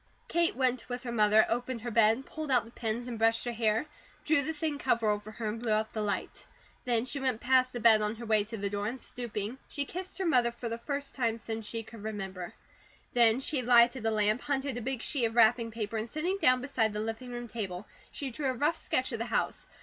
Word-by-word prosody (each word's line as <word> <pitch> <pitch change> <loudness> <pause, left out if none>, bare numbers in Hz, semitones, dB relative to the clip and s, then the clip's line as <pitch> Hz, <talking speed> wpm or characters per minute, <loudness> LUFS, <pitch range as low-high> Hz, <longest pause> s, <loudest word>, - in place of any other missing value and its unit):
Kate 340 0 +1
went 255 -2 0
with 245 +1 -4
her 240 - -4
mother, 215 -1 +5
opened 245 0 -2
her 240 +1 -4
bed, 225 +3 +4
pulled 310 -2 -6
out 250 -3 +3
the 230 - -13
pins, 230 0 -2
and 235 -3 -5
brushed 225 +1 +3
her 240 - -1
hair, 225 +1 +1 0.4
drew 305 -2 +4
the 300 +3 -2
thin 310 -2 -3
cover 230 -5 +1
over 210 0 0
her, 220 0 -5
and 215 +2 -3
blew 235 -2 -1
out 215 +1 +1
the 215 - -2
light. 200 -3 -3 0.4
Then 240 -1 +1
she 280 +2 -3
went 260 -4 0
past 255 +1 +3
the 245 - -4
bed 220 -1 +6
on 210 +1 0
her 235 +1 -8
way 215 -2 +3
to 225 +1 -6
the 200 -1 -3
door, 205 0 -2
and 250 +4 -4
stooping, 235 0 -4
she 285 - -2
kissed 370 +5 -7
her 380 - -2
mother 250 -8 +3
for 235 0 -6
the 230 +1 -4
first 280 +2 -4
time 230 -4 0
since 225 -1 -5
she 225 0 -4
could 225 0 -12
remember. 195 -4 -5 0.6
Then 235 0 +5
she 270 0 0
lighted 240 0 +5
a 225 - +2
lamp, 215 +1 +1
hunted 275 -2 -1
a - - -7
big 255 0 -3
sheet 265 -5 +1
of 225 0 -2
wrapping 230 0 +5
paper, 225 0 -4
and 220 +2 -3
sitting 345 - -1
down 255 -4 +5
beside 225 -5 0
the 210 - -3
living 225 +3 -4
room 240 0 -5
table, 200 -4 -5 0.2
she 275 -3 -5
drew 280 +3 -3
a - - 0
rough 300 +6 +1
sketch 255 +1 -1
of 230 - -3
the 230 - -2
house. - - -1
235 Hz, 245 wpm, -30 LUFS, 220-255 Hz, 0.6 s, bed